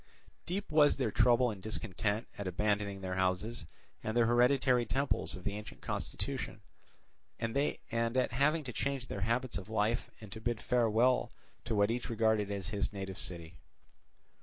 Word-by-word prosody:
Deep 195 +2 -3
was 150 -1 +5
their 130 -6 0
trouble 120 +3 +4
and 100 -3 -8
discontent 105 +1 -2
at 100 - -4
abandoning 100 +1 0
their 90 -1 -3
houses 95 +2 -1 0.4
and 110 +2 -1
the 120 - +5
hereditary 125 +1 +4
temples 135 +4 -1
of 95 - -9
the 100 - -2
ancient 105 0 -8
constitution, - - -4 0.8
and 115 +1 -2
at 125 -3 0
having 150 +6 +2
to 125 -3 -6
change 135 +4 -2
their 100 - -4
habits 115 0 0
of 95 - -11
life 110 +1 0
and 105 -3 -11
to 110 - -7
bid 120 -1 -1
farewell 120 +1 +3 0.3
to 110 - -1
what 100 +1 +3
each 120 +2 -3
regarded 110 -2 +2
as 100 -1 -3
his 100 -1 -1
native 95 -2 -5
city. 85 -2 -6
110 Hz, 160 wpm, -33 LUFS, 100-125 Hz, 0.8 s, was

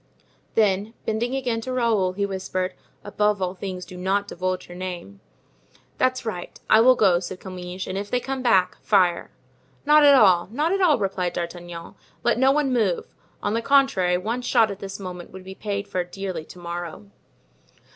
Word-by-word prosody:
Then 210 +1 +2
bending 235 +4 -1
again 245 -4 -1
to 255 - -5
Raoul, 225 -7 +1
he 200 +1 -1
whispered: 185 -1 -3 0.3
"Above 210 0 0
all 185 -1 -1
things 185 -1 -6
do 185 - -11
not 195 +3 0
divulge 185 0 -3
your 175 - -10
name." 175 - -6 0.8
"That's 255 -1 +1
right. 180 -6 -6
I 220 - +6
will 255 +2 +6
go," 180 -6 +4
said 180 +1 -7
Comminges; 185 -1 -7
"and 190 +1 -3
if 205 0 -6
they 250 - +1
come 265 +1 -4
back, 190 -7 +2
fire!" 185 -4 +2 0.6
"Not 300 +1 +6
at 285 -1 +8
all—not 230 - +3
at 390 0 +1
all," 325 -6 +5
replied 190 -4 -1
D'Artagnan; 170 -1 -6 0.3
"let 240 0 +2
no 265 +1 +5
one 280 -2 +1
move. 210 -8 0 0.3
On 205 - 0
the 230 - 0
contrary, 230 -10 +3
one 225 +7 -3
shot 225 -3 +3
at 200 - -7
this 195 0 -7
moment 180 -2 -7
would 190 0 -11
be 190 +1 -8
paid 200 0 -4
for 185 -3 -1
dearly 185 -2 -6
to - - -13
morrow." 170 - -7
195 Hz, 180 wpm, -24 LUFS, 180-230 Hz, 0.8 s, at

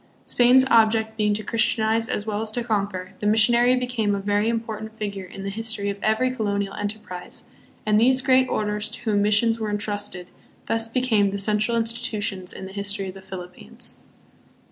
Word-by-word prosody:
Spain's 250 +2 +5
object 220 -1 +4
being 210 -1 +1
to 210 +1 -1
christianize 225 -1 +1
as 205 - -2
well 215 -1 -2
as 220 - -1
to 235 +2 -1
conquer, 200 -5 -2
the 210 - -1
missionary 235 +3 +4
became 245 -5 0
a - - -2
very 205 +2 +1
important 220 -1 -4
figure 200 -3 -5
hi - - -10
the 195 0 -4
history 215 -1 -1
of 200 0 -9
every 220 +4 +2
colonial 200 -4 -2
enterprise, 205 -3 -6 0.4
and 210 0 +3
these 255 +2 +4
great 260 -1 +4
orders 210 0 -1
to - - -8
whom 210 -3 +1
missions 215 +2 +3
were 215 -1 -2
intrusted 205 -3 -3 0.4
thus 225 0 0
became 225 -4 +2
the 200 - -3
central 210 +3 0
institutions 225 -5 -1
in 190 - -8
the 190 - -9
history 200 -1 -2
of - - -8
the 195 - -12
Philippines. 180 - -7
215 Hz, 180 wpm, -24 LUFS, 200-230 Hz, 0.4 s, Spain's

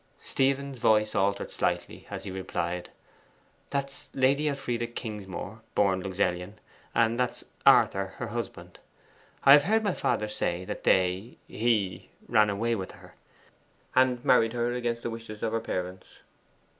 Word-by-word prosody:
Stephen's 135 -1 0
voice 105 -1 +3
altered 100 +1 0
slightly - - -2
as - - -6
he - - -6
replied 90 -2 -3 0.8
'That's 140 -1 -4
Lady 135 +3 +3
Elfride 120 -4 -3
Kingsmore 105 0 -6
born 95 -2 +3
Luxellian, 90 0 -1 0.4
and 115 +1 +3
that 125 -1 +3
is - - -8 0.2
Arthur, - - +5
her - - -4
husband. - - -6 0.6
I 140 - +9
have 145 0 +7
heard 220 +3 +2
my 200 -3 +1
father 105 - 0
say 90 -3 -2
that - - -6
they 95 +5 +2
he 110 -5 0 0.2
ran 110 -2 +4
away 115 +4 0
with 95 -4 -4
her, - - -15 0.8
and 130 -1 +3
married 115 -2 +4
her 120 0 0
against 120 -1 -2
the 120 - -2
wish 115 0 -8
of 105 0 -7
her 115 0 0
parents. 90 -3 -5
115 Hz, 145 wpm, -28 LUFS, 95-125 Hz, 0.8 s, I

